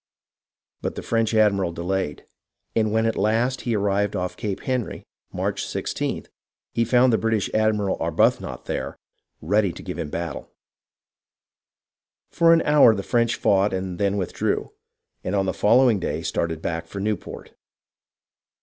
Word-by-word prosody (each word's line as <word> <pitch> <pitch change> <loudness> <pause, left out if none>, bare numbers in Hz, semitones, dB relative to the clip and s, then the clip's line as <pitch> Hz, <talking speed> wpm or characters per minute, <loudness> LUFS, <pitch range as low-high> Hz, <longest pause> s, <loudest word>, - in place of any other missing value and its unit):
But - - -3
the - - -6
French 115 -1 +1
admiral 100 -5 +3
delayed, 85 -2 -3 0.5
and 110 -2 +2
when 110 +1 +2
at 115 - +1
last 115 +5 +1
he 120 -2 -1
arrived 100 0 0
off 90 -1 -2
Cape 105 -4 -4
Henry, 130 -3 -3 0.3
March - - -2
i6th, - - -3 0.5
he 115 - +2
found 125 +1 +4
the 110 - +3
British 110 -3 0
admiral, 110 -3 +1
Arbuthnot, - - 0
there - - -4 0.5
ready 100 +3 +2
to - - -10
give - - -6
him - - -3
battle. 85 -2 -5 1.8
For 170 -1 +4
an 165 -1 +5
hour 145 -7 +6
the 100 - -4
French 115 +1 +1
fought 100 0 +2
and 95 -2 -4
then 100 0 +1
withdrew, 95 -3 -2 0.5
and 90 - -2
on 95 -1 +1
the 95 - -1
following 120 0 +4
day - - -3
started 80 -1 -2
back 85 0 -3
for 100 - -7
Newport 105 -2 -4
105 Hz, 150 wpm, -23 LUFS, 95-115 Hz, 1.8 s, hour